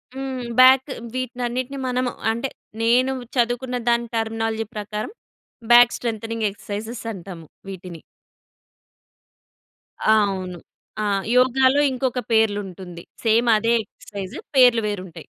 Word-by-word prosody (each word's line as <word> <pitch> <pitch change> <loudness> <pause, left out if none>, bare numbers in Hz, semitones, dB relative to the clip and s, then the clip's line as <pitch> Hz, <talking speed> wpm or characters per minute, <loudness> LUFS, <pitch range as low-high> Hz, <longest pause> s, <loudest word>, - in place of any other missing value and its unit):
హ్మ్. 265 -1 -4 0.2
బ్యాక్ 260 +2 +7 0.3
వీటినన్నిటిని 255 +1 -3
మనము 250 0 0 0.2
అంటే, 235 +4 -3 0.3
నేను 250 +3 +3 0.3
చదువుకున్న 245 +1 0
దాని 235 0 +1
టర్మినాలజీ 225 0 -1
ప్రకారం 210 - -4 0.6
బ్యాక్ 240 0 +7
స్ట్రెంగ్థెనింగ్ 225 -1 -2
ఎక్సర్‌సైజెస్ 215 +4 -7
అంటాము 175 -3 -9 0.2
వీటిని. 180 -3 -9 2.0
ఆ! - - +5 0.2
అవును. 185 -2 -5 0.4
ఆ! - - 0 0.3
యోగాలో 260 +2 +4
ఇంకొక 255 -1 -1
పేర్లుంటుంది. 195 -5 -1 0.2
సేమ్ 230 +1 +3
అదే 230 +2 +1
ఎక్సర్‌సైజ్ 200 -2 -9 0.2
పేర్లు 245 -3 +6
వేరుంటయి. 190 -5 -6
230 Hz, 100 wpm, -22 LUFS, 205-250 Hz, 2.0 s, బ్యాక్